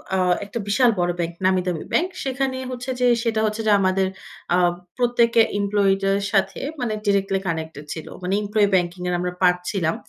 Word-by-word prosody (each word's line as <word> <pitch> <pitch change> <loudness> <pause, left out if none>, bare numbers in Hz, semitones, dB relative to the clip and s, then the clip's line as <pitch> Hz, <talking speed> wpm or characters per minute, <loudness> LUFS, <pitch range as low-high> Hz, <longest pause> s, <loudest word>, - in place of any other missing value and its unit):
আ - - +2 0.3
একটা 205 +3 -5
বিশাল 240 +4 +4
বড় 175 0 +2
ব্যাংক, 170 0 -1
নামি 185 -1 +3
দামি 175 -3 -2
ব্যাংক, 355 - +3 0.2
সেখানে 265 0 -1
হচ্ছে 250 +1 -6
যে 250 - +4 0.2
সেটা 225 -2 0
হচ্ছে 215 +1 -2
যে 210 - +5
আমাদের 190 0 +2 0.5
আ - - +3 0.4
প্রত্যেকে 235 -1 +3 0.2
এমপ্লয়িদের 195 -1 +2 0.2
সাথে 195 -1 +1 0.2
মানে 235 -3 -1
ডিরেক্টলি 195 -1 +1
কানেক্টেড 160 -3 -4
ছিল, 160 - -8 0.2
মানে 180 - -1
এমপ্লয়ি 210 0 +2
ব্যাংকিং 175 0 0
এর 180 - 0
আমরা 180 0 -2
পার্ট 180 -1 +4
পাচ্ছিলাম। 180 -2 -1
195 Hz, 180 wpm, -22 LUFS, 180-230 Hz, 0.5 s, যে